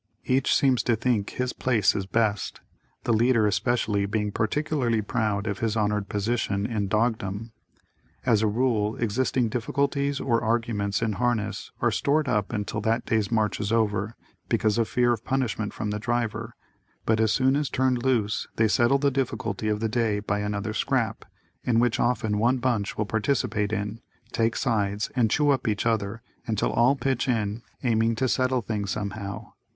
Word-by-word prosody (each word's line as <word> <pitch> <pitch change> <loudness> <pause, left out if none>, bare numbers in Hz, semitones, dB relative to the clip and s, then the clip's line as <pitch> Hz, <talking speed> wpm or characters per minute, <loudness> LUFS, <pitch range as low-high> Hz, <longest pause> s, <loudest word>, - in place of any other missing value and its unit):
Each 130 +1 +2
seems 130 -3 +3
to 120 - +1
think 115 -3 0
his 125 0 -2
place 115 -6 +2
is 95 -2 -3
best, 105 -2 0 0.4
the 120 - +1
leader 115 0 +3
especially 105 0 +1
being 105 0 -1
particularly 120 0 0
proud 105 -1 -1
of 100 -2 -3
his 115 -1 0
honored 105 -1 0
position 105 -1 -1
in 105 -4 -1
"Dogdom." 110 0 -1 0.7
As 110 -4 +3
a 110 - +3
rule, 110 -1 +1
existing 120 +1 0
difficulties 140 +4 -1
or 115 -3 +1
arguments 115 -3 0
in 110 -2 0
harness 115 0 -1
are - - +4
stored 145 +1 +1
up 105 -5 0
until 105 -1 -3
that 115 +3 0
day's 110 -2 0
march 110 -2 +1
is 105 0 -2
over, 110 -1 0 0.3
because 110 +1 +2
of 115 - +2
fear 120 -1 +3
of 115 -1 -5
punishment 120 -5 -1
from 105 -1 -3
the 105 - -2
driver, 115 0 -2 0.5
but 110 0 +2
as 110 -1 +3
soon 130 +1 +3
as 145 -1 0
turned 130 -1 +1
loose, 115 -5 0
they 110 - +3
settle 120 +5 +3
the 140 0 +1
difficulty 115 -5 -2
of 105 0 0
the 115 - +1
day 110 -2 0
by 100 0 -1
another 105 +1 -2
scrap, - - -1 0.4
in 120 -2 +1
which 120 0 +2
often 110 -3 +1
one 120 +4 +3
bunch 120 -5 -1
will 105 - 0
participate 110 -1 0
in, 105 +1 -3 0.3
"take 115 -1 +1
sides," 105 -5 0
and 120 -4 +3
chew 145 +5 +3
up 130 -3 0
each 105 0 0
other, 110 -1 -1 0.2
until 110 -2 0
all 120 +4 +4
pitch 135 -2 -1
in, 110 -2 -1 0.2
aiming 115 -2 +2
to 130 +4 0
settle 130 0 +1
things 105 -3 -3
somehow. 100 0 -5
110 Hz, 175 wpm, -26 LUFS, 105-125 Hz, 0.7 s, are